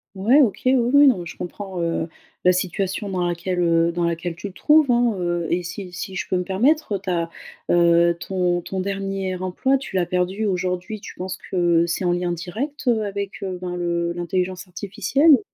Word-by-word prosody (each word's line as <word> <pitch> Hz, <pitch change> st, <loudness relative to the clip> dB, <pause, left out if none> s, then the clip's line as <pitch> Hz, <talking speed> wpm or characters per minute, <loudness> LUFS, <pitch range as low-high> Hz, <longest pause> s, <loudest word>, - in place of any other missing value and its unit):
Ouais 235 Hz, +10 st, +5 dB
OK, 230 Hz, -7 st, +1 dB
oui, 255 Hz, -, +5 dB
oui, 265 Hz, +4 st, +5 dB
non, 245 Hz, -8 st, +4 dB
mais 175 Hz, -, -6 dB
je -, -, -9 dB
comprends, 185 Hz, +1 st, -6 dB
heu, 165 Hz, -1 st, -1 dB, 0.3 s
la 180 Hz, -, +6 dB
situation 190 Hz, +2 st, -2 dB
dans 180 Hz, -2 st, -1 dB
laquelle, 180 Hz, +1 st, -2 dB
heu, 170 Hz, -1 st, +3 dB
dans 175 Hz, 0 st, -1 dB
laquelle 170 Hz, 0 st, -2 dB
tu 200 Hz, +4 st, -6 dB
te -, -, -27 dB
trouves, 300 Hz, -3 st, +5 dB
hein, 240 Hz, -2 st, +3 dB
heu, 175 Hz, -1 st, -1 dB
et 175 Hz, -, +1 dB
si 180 Hz, +1 st, -7 dB
si 190 Hz, +1 st, -6 dB
je -, -, -3 dB
peux 185 Hz, -, 0 dB
me 180 Hz, -, 0 dB
permettre, 240 Hz, -, +1 dB
heu, -, -, -2 dB
ta, 175 Hz, -3 st, -2 dB, 0.4 s
heu, 170 Hz, 0 st, +4 dB
ton 180 Hz, -2 st, 0 dB
ton 190 Hz, +2 st, -5 dB
dernier 195 Hz, -1 st, -2 dB
emploi 185 Hz, +9 st, 0 dB
tu 260 Hz, -7 st, -8 dB
l'as 175 Hz, -2 st, +1 dB
perdu 185 Hz, +4 st, -1 dB
aujourd'hui, 185 Hz, +2 st, -2 dB
tu 205 Hz, -, -10 dB
penses 185 Hz, 0 st, -5 dB
que 170 Hz, -2 st, +3 dB
c'est 170 Hz, +2 st, -2 dB
en 175 Hz, -, +3 dB
lien 175 Hz, 0 st, 0 dB
direct, 235 Hz, -, -5 dB
heu, 225 Hz, -3 st, +3 dB
avec, 200 Hz, 0 st, -5 dB
heu, 185 Hz, -2 st, -4 dB
ben, 180 Hz, -1 st, -4 dB
le 170 Hz, -1 st, -1 dB
l'intelligence 180 Hz, +2 st, -2 dB
artificielle? 215 Hz, -, +3 dB
185 Hz, 205 wpm, -22 LUFS, 175-205 Hz, 0.4 s, la